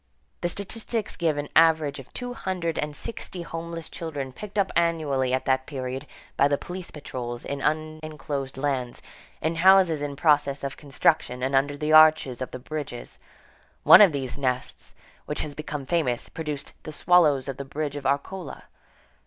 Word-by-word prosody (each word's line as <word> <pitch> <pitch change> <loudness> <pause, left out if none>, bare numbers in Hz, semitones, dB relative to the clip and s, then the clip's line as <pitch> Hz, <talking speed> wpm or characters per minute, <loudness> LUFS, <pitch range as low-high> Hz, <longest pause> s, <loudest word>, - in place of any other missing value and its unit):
The 175 - 0
statistics 220 +3 -3
give 160 -4 0
an 145 0 -3
average 160 -3 +4
of 135 - -12
two 245 -1 -5
hundred 185 -7 -3
and 150 0 -3
sixty 185 -3 -4
homeless 165 0 -6
children 145 -6 -6
picked 210 +7 -9
up 195 -2 +2
annually 155 -6 +1
at 130 0 0
that 130 0 +1
period, 130 -2 -5 0.3
by 140 - +4
the 145 0 +1
police 180 +3 -7
patrols, 120 -5 -6
in 140 0 -4
unenclosed 155 -3 -3
lands, 135 -3 -2 0.4
in 160 +1 0
houses 185 -3 +5
in 145 -1 -3
process 145 -2 +2
of 140 0 -3
construction, 140 -3 0
and 135 +1 0
under 145 +2 +2
the 150 +1 0
arches 155 -5 +6
of 130 - -3
the - - -7
bridges. 140 -2 -7 0.6
One - - +10
of 200 -5 +8
these 135 -2 -4
nests, 130 -2 -3 0.3
which - - -2
has 150 - -5
become 150 -1 -5
famous, 140 -7 -1
produced 150 -3 -5
"the 155 - -8
swallows 150 -5 +3
of 135 -1 -4
the 140 - -4
bridge 145 +1 -4
of 140 -2 -3
Arcola." 145 +5 -3
150 Hz, 170 wpm, -25 LUFS, 135-165 Hz, 0.6 s, One